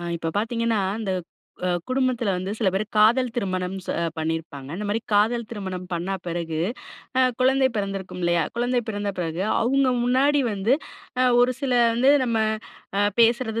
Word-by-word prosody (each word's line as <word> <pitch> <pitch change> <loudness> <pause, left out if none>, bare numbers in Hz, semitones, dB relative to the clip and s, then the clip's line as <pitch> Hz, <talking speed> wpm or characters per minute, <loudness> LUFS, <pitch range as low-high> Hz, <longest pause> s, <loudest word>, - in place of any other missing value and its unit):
அ, - - -7 0.2
இப்ப 165 0 -3
பாத்தீங்கனா 230 0 0 0.2
இந்த 200 -4 -2 0.5
அ - - +1 0.2
குடும்பத்துல 255 -4 +1
வந்து 190 +3 -3
சில 220 - +2
பேரு 195 +2 0
காதல் 235 +4 +5
திருமணம் 185 -4 -2
ச - - -17 0.3
பண்ணிருப்பாங்க. 160 -4 -4
இந்த 210 - -4
மாரி 215 +2 0
காதல் 225 +3 +2
திருமணம் 190 -5 -5
பண்ணா 175 +3 -2
பெறகு 165 -2 -3 0.6
அ - - +5 0.2
குழந்தை 265 +1 +4
பிறந்திருக்கும் 195 -2 -4
இல்லையா? 175 -1 +2
குழந்தை 245 +1 +1
பிறந்த 205 -1 -2
பிறகு, 170 0 -2 0.2
அவுங்க 265 +2 +3
முன்னாடி 275 +4 +3
வந்து 200 +4 +1 0.5
அ - - +4 0.2
ஒரு 245 +1 +4
சில 275 -2 -1 0.2
வந்து 245 +4 +4
நம்ம 235 -2 0 0.6
அ - - +3 0.2
பேசறது 230 -1 +3
215 Hz, 160 wpm, -24 LUFS, 185-245 Hz, 0.6 s, காதல்